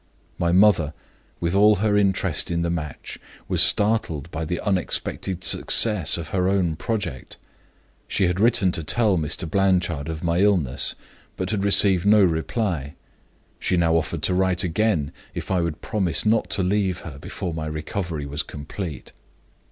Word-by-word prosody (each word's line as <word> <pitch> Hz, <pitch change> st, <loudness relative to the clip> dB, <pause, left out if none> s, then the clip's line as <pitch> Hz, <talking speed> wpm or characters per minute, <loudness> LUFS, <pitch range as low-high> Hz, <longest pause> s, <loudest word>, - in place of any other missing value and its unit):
My 85 Hz, 0 st, +1 dB
mother, 90 Hz, -5 st, +3 dB, 0.4 s
with 85 Hz, +1 st, -2 dB
all 105 Hz, +2 st, +5 dB
her 105 Hz, +1 st, 0 dB
interest 95 Hz, -4 st, +1 dB
in 85 Hz, -1 st, -1 dB
the 85 Hz, -, -1 dB
match, 75 Hz, -4 st, -6 dB, 0.3 s
was -, -, +2 dB
startled 95 Hz, -8 st, +2 dB
by 80 Hz, +1 st, -4 dB
the 85 Hz, +2 st, -3 dB
unexpected 95 Hz, -1 st, -2 dB
success 100 Hz, 0 st, +3 dB
of 80 Hz, -2 st, -7 dB
her 90 Hz, +1 st, 0 dB
own 90 Hz, -5 st, 0 dB
project. 100 Hz, -, -4 dB, 0.7 s
She 95 Hz, -, +1 dB
had 90 Hz, +1 st, -1 dB
written 110 Hz, -4 st, +3 dB
to 85 Hz, -, -3 dB
tell 105 Hz, +4 st, +3 dB
Mr. 80 Hz, +1 st, -2 dB
Blanchard 90 Hz, -5 st, 0 dB
of 80 Hz, 0 st, -6 dB
my 85 Hz, 0 st, 0 dB
illness, 90 Hz, -10 st, +1 dB, 0.4 s
but 95 Hz, +1 st, -3 dB
had 100 Hz, -3 st, -1 dB
received 100 Hz, -2 st, +4 dB
no 105 Hz, -1 st, +6 dB
reply. 80 Hz, -, -2 dB, 0.6 s
She 90 Hz, -, 0 dB
now 85 Hz, -1 st, +2 dB
offered 80 Hz, -1 st, -2 dB
to 90 Hz, -, +1 dB
write 95 Hz, 0 st, +1 dB
again, 90 Hz, -5 st, 0 dB, 0.2 s
if -, -, -5 dB
I 90 Hz, -2 st, +1 dB
would 85 Hz, -2 st, -4 dB
promise 95 Hz, -5 st, 0 dB
not 105 Hz, -4 st, +1 dB
to 95 Hz, 0 st, 0 dB
leave 95 Hz, -1 st, -1 dB
her 70 Hz, -, -10 dB
before 85 Hz, +4 st, -6 dB
my 80 Hz, -1 st, -4 dB
recovery 75 Hz, 0 st, -4 dB
was 70 Hz, +2 st, -3 dB
complete. 75 Hz, 0 st, -8 dB
90 Hz, 160 wpm, -23 LUFS, 80-100 Hz, 0.7 s, no